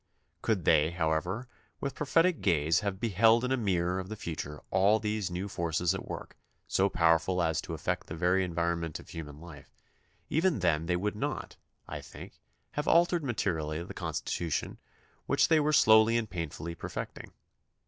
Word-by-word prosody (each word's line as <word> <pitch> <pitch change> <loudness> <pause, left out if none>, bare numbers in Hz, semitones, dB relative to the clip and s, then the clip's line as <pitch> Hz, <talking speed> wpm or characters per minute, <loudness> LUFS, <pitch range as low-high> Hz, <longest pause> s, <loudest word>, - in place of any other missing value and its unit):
Could 100 -7 0
they, 75 -1 +5
however, 85 +7 -1 0.3
with 140 - -3
prophetic 165 +4 +2
gaze 80 -2 +3
have 100 -2 -3
beheld 115 +2 +4
in 125 - -2
a - - +4
mirror 95 -6 0
of 95 0 -6
the 110 - -4
future 75 -6 -5
all 100 +3 +4
these 105 -3 -2
new 90 +3 -3
forces 85 -2 0
at - - -6
work, - - -7 0.3
so 100 +1 +2
powerful 85 +1 +2
as 80 -1 0
to - - -6
affect - - -3
the 80 - -6
very 90 +3 +2
environment 85 -2 -1
of - - -14
human 75 -3 -8
life, 80 -4 -12 0.6
even 165 +1 +2
then 80 -4 +1
they 90 - +2
would 105 +4 -1
not, 105 - -4 0.3
I - - -6
think, - - -12 0.3
have 150 - -3
altered 170 -1 +4
materially 85 - -2
the - - -8
Constitution 85 -3 -3 0.5
which - - +3
they 160 -1 +5
were 150 0 +2
slowly 110 -4 +6
and 115 -2 -1
painfully 85 -1 -5
per 85 - -7
fecting. - - -6
90 Hz, 170 wpm, -30 LUFS, 85-110 Hz, 0.6 s, slowly